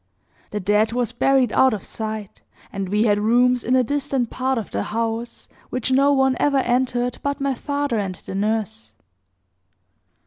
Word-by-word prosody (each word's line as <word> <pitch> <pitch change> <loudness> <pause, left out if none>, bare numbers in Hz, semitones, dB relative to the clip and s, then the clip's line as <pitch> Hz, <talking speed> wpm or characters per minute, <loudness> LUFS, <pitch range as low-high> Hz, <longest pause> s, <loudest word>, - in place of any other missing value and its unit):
The 210 - -3
dead 210 +3 +2
was 245 -1 -1
buried 260 +1 +2
out 260 -4 +4
of 200 - -9
sight; 215 -2 -6 0.3
and 195 -2 -3
we 210 +2 +2
had 205 -2 +3
rooms 245 +3 +3
in 250 - +1
a 255 - +4
distant 275 -2 -1
part 260 0 -1
of 220 - -5
the 100 - -1
house, 230 - -4 0.2
which 255 +1 -2
no 275 +2 +4
one 265 -2 +3
ever 285 -1 +2
entered 245 -1 0
but 280 0 -2
my 275 -1 0
father 285 -2 -2
and 190 -2 -3
the - - -9
nurse. 200 - -2
240 Hz, 170 wpm, -22 LUFS, 210-260 Hz, 0.3 s, out